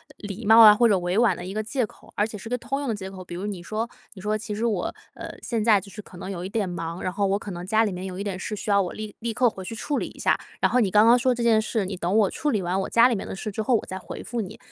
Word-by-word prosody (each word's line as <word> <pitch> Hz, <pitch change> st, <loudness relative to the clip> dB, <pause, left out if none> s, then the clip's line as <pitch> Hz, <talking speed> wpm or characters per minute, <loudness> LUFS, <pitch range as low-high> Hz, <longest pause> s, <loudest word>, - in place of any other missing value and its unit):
礼 205 Hz, +2 st, -7 dB
貌 225 Hz, +2 st, +8 dB
啊， 210 Hz, -1 st, +11 dB
或 235 Hz, +2 st, +4 dB
者 200 Hz, -3 st, +4 dB
委 175 Hz, +2 st, -1 dB
婉 230 Hz, -5 st, +4 dB
的 -, -, -8 dB
一 190 Hz, -, -6 dB
个 215 Hz, -, -1 dB
借 235 Hz, +2 st, -1 dB
口， -, -, -18 dB
而 205 Hz, -, +2 dB
且 215 Hz, -1 st, -7 dB
是 210 Hz, -, -9 dB
个 250 Hz, -, -1 dB
通 260 Hz, +4 st, -3 dB
用 285 Hz, -, -3 dB
的 225 Hz, -, 0 dB
借 190 Hz, -1 st, -7 dB
口。 185 Hz, -1 st, -9 dB
比 175 Hz, -, -7 dB
如 185 Hz, -, -4 dB
你 200 Hz, -4 st, -4 dB
说 220 Hz, +6 st, -3 dB, 0.2 s
你 190 Hz, -, -11 dB
说： 215 Hz, +2 st, 0 dB
“其 215 Hz, -1 st, -5 dB
实 225 Hz, +3 st, -1 dB
我， 210 Hz, -6 st, 0 dB, 0.3 s
呃， -, -, -7 dB
现 230 Hz, -3 st, -2 dB
在 210 Hz, -3 st, +4 dB
就 200 Hz, +1 st, -13 dB
是 210 Hz, -, -8 dB
可 190 Hz, -, -16 dB
能 185 Hz, +2 st, -6 dB
有 180 Hz, -2 st, -5 dB
一 190 Hz, -, -5 dB
点 205 Hz, -3 st, -1 dB
忙， 165 Hz, 0 st, -5 dB
然 185 Hz, -, -1 dB
后 200 Hz, +1 st, 0 dB
我 195 Hz, +1 st, +1 dB
可 205 Hz, -, -7 dB
能 175 Hz, 0 st, -6 dB
家 220 Hz, +2 st, +3 dB
里 210 Hz, -, 0 dB
面 180 Hz, +1 st, -5 dB
有 185 Hz, -1 st, -6 dB
一 200 Hz, -, -3 dB
点 195 Hz, -3 st, -4 dB
事 210 Hz, -, -4 dB
需 210 Hz, -, -6 dB
要 200 Hz, 0 st, +5 dB
我 180 Hz, -, -3 dB
立 215 Hz, -1 st, -7 dB
立 230 Hz, 0 st, -3 dB
刻 245 Hz, +1 st, +3 dB
回 190 Hz, -3 st, -9 dB
去 225 Hz, -, -6 dB
处 285 Hz, +6 st, -2 dB
理 -, -, -2 dB
一 -, -, -14 dB
下。 -, -, +2 dB, 0.2 s
然 -, -, +3 dB
后 250 Hz, -, +4 dB
你 210 Hz, -5 st, +2 dB
刚 210 Hz, +3 st, +5 dB
刚 240 Hz, +2 st, +6 dB
说 250 Hz, 0 st, +2 dB
这 235 Hz, -, -2 dB
件 225 Hz, -2 st, +4 dB
事， 215 Hz, -2 st, -1 dB
你 185 Hz, -1 st, -5 dB
等 175 Hz, +3 st, -1 dB
我 205 Hz, -3 st, +3 dB
处 300 Hz, -, -1 dB
理 210 Hz, -4 st, 0 dB
完 180 Hz, +2 st, -1 dB
我 -, -, -4 dB
家 235 Hz, +2 st, +6 dB
里 240 Hz, -, +1 dB
面 195 Hz, -, -5 dB
的 -, -, -5 dB
事 210 Hz, -, -5 dB
之 220 Hz, -, -3 dB
后， 240 Hz, +3 st, +2 dB
我 -, -, -1 dB
再 190 Hz, 0 st, -6 dB
回 -, -, -8 dB
复 240 Hz, -, -4 dB
你。” 200 Hz, -5 st, -5 dB
210 Hz, 380 characters per minute, -25 LUFS, 190-225 Hz, 0.3 s, 啊